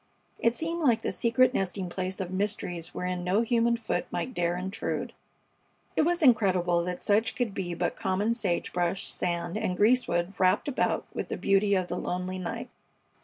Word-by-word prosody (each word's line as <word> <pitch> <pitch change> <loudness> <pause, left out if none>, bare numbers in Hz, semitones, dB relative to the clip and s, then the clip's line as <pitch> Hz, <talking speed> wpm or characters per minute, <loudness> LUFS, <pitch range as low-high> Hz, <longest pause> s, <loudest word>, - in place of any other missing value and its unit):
It 230 +1 +2
seemed 335 +3 -3
like 240 -6 +3
the - - 0
secret 250 +2 +3
nesting 190 -3 -1
place 185 +1 -4
of 185 -2 -3
mysteries 185 -4 -2
wherein 180 0 -3
no 190 +6 +2
human 235 0 +2
foot 230 - -2
might 255 - -3
dare 175 -2 0
intrude. 190 +4 -3 0.8
It - - +4
was 345 +1 +1
incredible 185 - +4
that 180 0 -4
such 215 +2 +2
could 240 -5 -1
be 175 -3 -3
but 175 +1 -1
common 200 +4 0
sage 200 -7 -1
brush, 175 +2 0
sand, 175 +1 -1
and 180 -3 -1
greasewood 205 -6 +2
wrapped 185 +7 +3
about 280 - 0
with - - -3
the - - -4
beauty 200 +1 +3
of 185 -1 +1
the 175 - -4
lonely 180 +1 -3
night. 230 +6 -5
195 Hz, 175 wpm, -28 LUFS, 180-230 Hz, 0.8 s, It